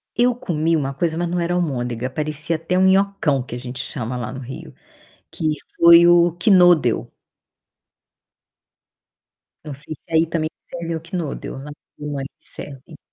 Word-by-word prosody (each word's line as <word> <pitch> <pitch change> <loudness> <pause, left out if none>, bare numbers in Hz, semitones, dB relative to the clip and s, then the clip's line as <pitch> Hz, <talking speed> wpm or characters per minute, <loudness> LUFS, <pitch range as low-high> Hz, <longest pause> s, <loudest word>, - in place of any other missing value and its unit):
Eu 245 0 +3
comi 165 -6 0
uma 140 -3 -1
coisa, 160 +3 -1
mas 175 0 -1
não 175 0 -1
era 170 +1 0
almôndega, 125 -7 -2
parecia 155 +3 -2
até 165 +3 -1
um 190 - +4
nhocão 190 -8 +2
que 120 - -10
a - - -4
gente 125 +1 -7
chama 125 -2 -4
lá 120 - -4
no 130 - -7
Rio, 130 +1 -9 0.6
que - - -7 0.3
foi 170 0 +8
o 175 -1 +5
Knödel. 175 - +4 2.6
Não 150 - -6
sei, 140 +3 -5
se - - -19
aí 160 +1 +4
também 160 -1 -1
serve 170 -1 -6
o 160 - -5
Knödel, 165 -3 -5
lá 135 - -9
onde 145 - -10 0.2
eu 150 - -6
morei 135 -1 -4
serve. 140 +2 -9
160 Hz, 165 wpm, -21 LUFS, 135-175 Hz, 2.6 s, foi